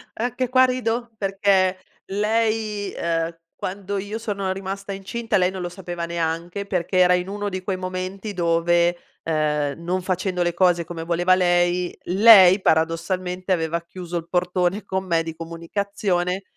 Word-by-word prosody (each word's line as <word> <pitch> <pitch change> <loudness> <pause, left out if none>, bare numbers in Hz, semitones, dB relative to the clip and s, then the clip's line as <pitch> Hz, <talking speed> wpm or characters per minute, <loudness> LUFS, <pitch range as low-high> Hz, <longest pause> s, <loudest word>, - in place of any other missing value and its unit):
Anche 245 +2 -2
qua 255 0 +6
rido, 240 -2 -2
perché 195 -1 +2 0.3
lei, 215 0 0
ehm, 165 0 -1 0.2
quando 200 +1 -4
io 205 +3 -5
sono 200 -4 -3
rimasta 195 +1 -6
incinta 210 +3 -2
lei 180 0 +2
non 190 -1 -6
lo 175 - -3
sapeva 175 -2 -5
neanche, 170 +3 -3
perché 185 -1 -1
era 180 0 +6
in 180 0 0
uno 205 0 -3
di 185 -1 -4
quei 190 0 -2
momenti 185 +3 -5
dove, 170 0 +2 0.3
uhm, 150 -2 0
non 180 +2 -1
facendo 185 0 -1
le 175 - 0
cose 175 -1 +3
come 165 -1 -6
voleva 175 +2 +3
lei, 175 0 +1
lei 190 -1 +7
paradossalmente 180 +3 0
aveva 170 -1 0
chiuso 175 0 -6
il 165 - -6
portone 180 +2 0
con 190 -1 -3
me 165 -2 +1
di 165 -1 -6
comunicazione 180 +2 -2
185 Hz, 150 wpm, -23 LUFS, 175-200 Hz, 0.3 s, lei